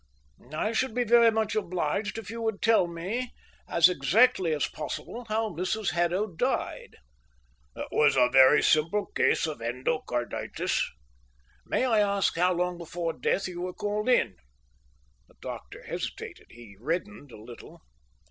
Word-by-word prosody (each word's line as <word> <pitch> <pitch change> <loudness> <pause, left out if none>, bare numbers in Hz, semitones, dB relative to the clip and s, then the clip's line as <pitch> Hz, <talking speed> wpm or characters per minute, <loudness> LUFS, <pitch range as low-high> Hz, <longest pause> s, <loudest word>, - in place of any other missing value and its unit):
"I 185 +8 -1
should 230 +1 -1
be 250 - +2
very 235 0 +6
much 220 -1 0
obliged 190 +2 -2
if 225 -2 -7
you 230 0 -6
would 220 -3 -2
tell 225 -6 +4
me 195 +9 -4 0.4
as 170 0 +6
exactly 180 - +3
as 150 -2 +1
possible 235 +9 -6
how 220 +1 0
Mrs 185 +5 -2
Haddo 175 +4 +1
died." 180 -7 -3 0.8
"It - - -5
was 150 - +4
a 125 -2 +5
very 130 +3 +6
simple 165 +7 +2
case - - +2
of 155 -6 -5
endocarditis." 120 +1 -2 0.9
"May - - +1
I 225 -4 +3
ask 200 -1 +1
how 180 +2 +3
long 180 0 -2
before 170 0 -4
death 175 +9 -1
you 175 -1 -6
were 180 0 -4
called 210 +3 -2
in?" 115 - +2 0.9
The - - -24
doctor - - -8
hesitated. - - -6
He 115 -4 -14
reddened 165 - -4
a 110 - -12
little. 115 - -13
180 Hz, 145 wpm, -27 LUFS, 155-215 Hz, 0.9 s, very